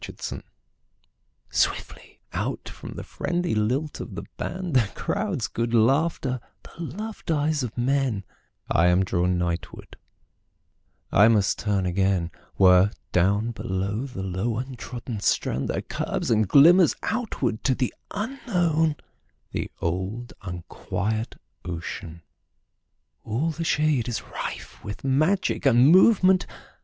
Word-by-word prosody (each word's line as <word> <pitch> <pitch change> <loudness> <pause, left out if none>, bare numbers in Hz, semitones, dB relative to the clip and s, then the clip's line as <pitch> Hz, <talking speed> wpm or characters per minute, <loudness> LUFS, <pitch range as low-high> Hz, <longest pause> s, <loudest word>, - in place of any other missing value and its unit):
Seaside - - -6 1.1
SWIFTLY - - -1
out - - -3
from - - -8
the - - -7
friendly 175 0 -2
lilt 125 +8 0
of - - -7
the - - -5
band, 180 -2 -4
The 120 -6 +3
crowd's 200 - -1
good 115 +1 -1
laughter, 130 +2 +2 0.2
the - - -14
loved 210 +6 -7
eyes 155 -1 +1
of 125 -3 -5
men,I 120 - -1
am 90 +2 +4
drawn 90 0 +1
nightward; 85 -1 -4 1.1
I 105 +3 +7
must 105 -3 +3
turn 100 -2 0
againWhere, 95 +1 +3 0.2
down 100 +6 +2
beyond 100 +2 -2
the 95 -8 -6
low 95 +5 -2
untrodden 125 -2 -5
strand, 70 -8 0
There - - -2
curves - - -2
and 110 -2 +3
glimmers 165 - +7
outward 200 - -2
to 130 - +3
the 125 -2 -1 0.2
unknownThe 175 - -2
old 95 +8 -3
unquiet 105 +4 -3 0.3
ocean. 85 -1 -6 1.0
All 135 +10 -1
the 165 +2 -4
shadeIs 145 -7 0
rife - - -6
with 100 0 -7
magic 155 +5 +2
and 125 +2 +6
movement. 185 0 +6
120 Hz, 115 wpm, -25 LUFS, 95-155 Hz, 1.1 s, I